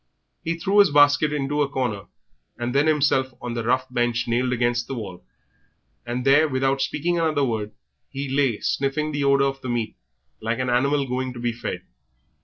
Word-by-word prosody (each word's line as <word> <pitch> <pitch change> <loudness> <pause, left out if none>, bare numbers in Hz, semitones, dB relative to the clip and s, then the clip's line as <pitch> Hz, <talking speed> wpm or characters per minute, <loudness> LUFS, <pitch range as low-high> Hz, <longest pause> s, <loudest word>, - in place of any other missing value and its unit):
He 165 +1 -2
threw 195 +4 +2
his 200 - +7
basket 145 +1 +4
into 145 0 -1
a 140 - +1
corner, 120 -8 -2 0.5
and 120 +1 -3
then 140 +2 +3
himself 135 -4 +2
on 120 -1 -5
the 115 -1 -3
rough 130 +3 +1
bench 120 -1 0
nailed 125 +2 0
against 120 -1 0
the 135 - -4
wall, 100 -6 -7 0.8
and 125 +1 -3
there, 145 +3 +5
without 135 0 0
speaking 170 +6 -1
another 155 -3 +1
word, 110 -4 -2 0.4
he 140 - -5
lay 135 -5 +1
sniffing 145 +3 -1
the 145 -1 -2
odour 140 0 +4
of 135 0 -4
the 130 - -5
meat 120 -2 -2 0.5
like 115 +1 -1
an 130 -1 -1
animal 140 +3 +2
going 130 0 -2
to 120 - -9
be 120 0 -1
fed. 115 0 -5
130 Hz, 190 wpm, -23 LUFS, 120-145 Hz, 0.8 s, his